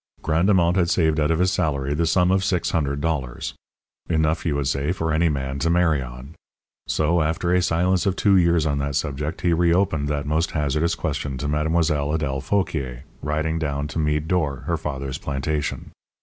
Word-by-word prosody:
Grandemont 85 +2 +3
had 85 -2 +2
saved 80 -3 +2
out 75 0 +2
of 80 - +2
his 90 +2 +2
salary 70 -6 0
the 85 +2 0
sum 90 +2 +3
of 95 0 +2
six 95 -3 0
hundred 70 -3 -1
dollars. 70 -6 -2 0.6
Enough, 80 0 +1
you 75 - 0
would 70 -1 -1
say, 70 +3 0
for 80 -3 -1
any 85 +1 +3
man 70 -1 -3
to 85 - 0
marry 85 -4 +3
on. 65 +3 -9 0.5
So, 85 +2 +1
after 80 +3 0
a 90 - +4
silence 90 +2 +1
of 95 - +1
two 100 0 +3
years 85 -3 +3
on 70 -2 0
that 70 0 -2
subject, 75 +2 -2
he 85 -2 +2
reopened 85 -3 +2
that 75 -1 -2
most 80 +3 0
hazardous 75 +3 0
question 70 -2 -3
to 70 - -3
Mlle. 75 +1 0
Adèle 75 -4 0
Fauquier, 70 -7 -2 0.2
riding 80 +2 -1
down 70 -2 -2
to 80 - -3
Meade 75 0 0
d'Or, 75 -7 0
her 85 - -1
father's 70 -4 -4
plantation. 70 +2 -3
80 Hz, 190 wpm, -23 LUFS, 70-85 Hz, 0.6 s, a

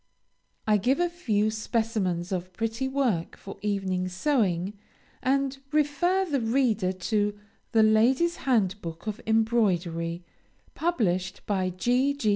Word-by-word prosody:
I 215 -1 +4
give 255 - +1
a 350 0 +2
few 215 - 0
specimens 215 -5 -1
of 185 -1 -3
pretty 225 +5 -2
work 255 -11 -1
for 195 - -10
evening 190 -3 -1
sewing, 185 - 0 0.5
and 275 +1 +1 0.2
refer 305 +6 +2
the 285 -7 -1
reader 225 -5 +1
to 205 +2 -1 0.3
"The 225 -2 +5
Ladies' 245 +10 +3
Handbook 195 -9 -1
of 215 -1 -4
Embroidery," 180 -7 +1 0.5
published 190 - -1
by 190 -3 0
G. 245 +9 +1
G. 270 -7 0
215 Hz, 120 wpm, -27 LUFS, 185-265 Hz, 0.5 s, The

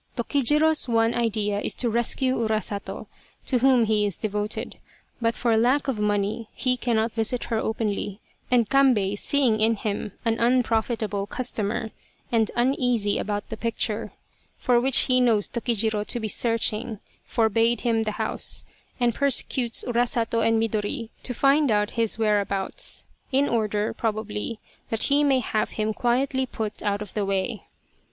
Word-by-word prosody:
Tokijiro's 295 +4 +2
one 230 0 +2
idea 215 -3 0
is - - -1
to 245 - 0
rescue 240 +3 +1
Urasato, 215 -3 -3 0.4
to 255 - +1
whom 255 -2 +4
he 215 -1 +2
is 205 -3 -1
de 215 - -2
voted, 210 +1 -4 0.4
but 230 0 +1
for 230 -2 +1
lack 255 +6 +2
of 255 -6 -1
money 210 +2 -1
he 255 -1 +1
cannot 230 -2 0
visit 225 +2 -1
her 220 - +2
openly, 210 -2 -2 0.3
and 240 -3 +3
Kambei, 240 -8 +3
seeing 245 0 +1
in 225 +1 +4
him 205 -1 -4
an 225 0 +1
unprofitable 225 -4 +1
customer, 220 -2 -2 0.4
and 225 -2 +2
uneasy 240 -4 +2
about 205 0 -3
the 220 - -5
picture, 220 -2 -2 0.5
for 245 -1 +2
which 265 +1 +3
he 255 -1 +3
knows 225 -5 +3
Tokijiro 225 -3 0
to 240 - -1
be 220 - -3
searching, 225 -1 0 0.3
forbade 230 0 +2
him 230 -2 +1
the 215 -1 -1
house, - - -1 0.3
and 240 -1 +2
persecutes 255 -2 +1
Urasato 235 -1 0
and 225 0 +3
Midori 220 +1 -2
to - - -3
find 280 +3 +3
out 210 -1 +1
his 230 -2 0
whereabouts, 210 - -1 0.3
in 275 +2 +3
order, 215 -2 0
probably, 215 0 -3 0.3
that 225 - -1
he 290 +1 +3
may 270 -3 +3
have 215 -2 -1
him 215 0 -1
quietly 260 +3 0
put 220 -4 -4
out 205 0 -1
of 210 - -13
the 210 - -1
way. 195 +3 -2
225 Hz, 155 wpm, -25 LUFS, 210-245 Hz, 0.5 s, whom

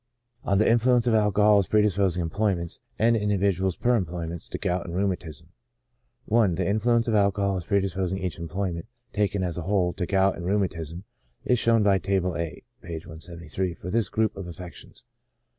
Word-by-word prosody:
On 100 - +1
the 110 - +3
Influence 120 +1 +4
of 120 - +2
Alcbhol 105 -1 +4
as 95 - 0
predisposing 100 -5 +2
Employments^ 95 -3 -1 0.2
and 115 +1 +3
Individuals 100 -3 +1
per 120 -3 +2
Employments^ 85 -1 -5
to - - -4
Gout 90 0 -1
and 85 - -5
Rheumatism, 90 -6 -3 0.8
I. 115 -1 +5
The 90 0 -1
influence 115 +3 +2
of 115 - +1
alcohol 100 -1 +2
as 90 - -6
predisposing 95 -2 0
each 90 -4 -4
employment 85 +2 -3 0.2
,^ - - -39
taken 100 -2 +1
as 90 -1 -2
a - - -3
whole^ 90 -1 0
to 90 - -2
gout 95 0 +2
and 85 - -6
rheumatism^ 90 -4 -2 0.4
is 125 -2 +2
shown 115 -2 +3
by 100 -2 +4
Table 95 -1 0
A 85 0 -4 0.2
(p. 85 - -8
173) 85 +2 -5
for 90 - -7
this 115 -1 +1
group 110 -1 0
of 95 -2 -7
affections. 85 0 -11
95 Hz, 175 wpm, -26 LUFS, 85-105 Hz, 0.8 s, I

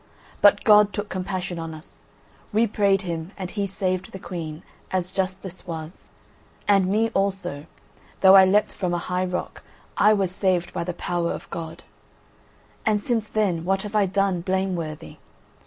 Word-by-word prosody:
But 205 0 +6
God 210 -1 +6
took 205 0 -4
compassion 185 -1 -3
on 165 -1 -5
us; 155 +2 -16 0.5
we 220 +2 +3
prayed 200 -2 +2
him 170 +1 -5
and 185 -2 -5
he 200 -2 -2
saved 185 -1 -2
the - - -7
Queen, 165 -4 -6 0.3
as 185 -1 -2
justice 190 -1 -4
was: 160 0 -7 0.6
and 195 -2 +4
me 220 +4 +2
also—though 190 0 0
I 190 - +10
leapt 200 +3 +3
from 180 -3 -1
a 175 - -4
high 180 +1 +1
rock, 180 0 -4 0.4
I 210 +1 +6
was 195 -3 0
saved 185 -2 0
by - - -2
the 180 +1 -3
power 175 -1 -1
of - - -6
God. 165 -2 -6 1.0
And 215 -1 +2
since 225 0 -1
then 195 -7 0
what 195 +2 0
have 210 0 -7
I 205 -2 +4
done 195 -2 +1
blameworthy? 175 - -3
190 Hz, 160 wpm, -24 LUFS, 175-200 Hz, 1.0 s, I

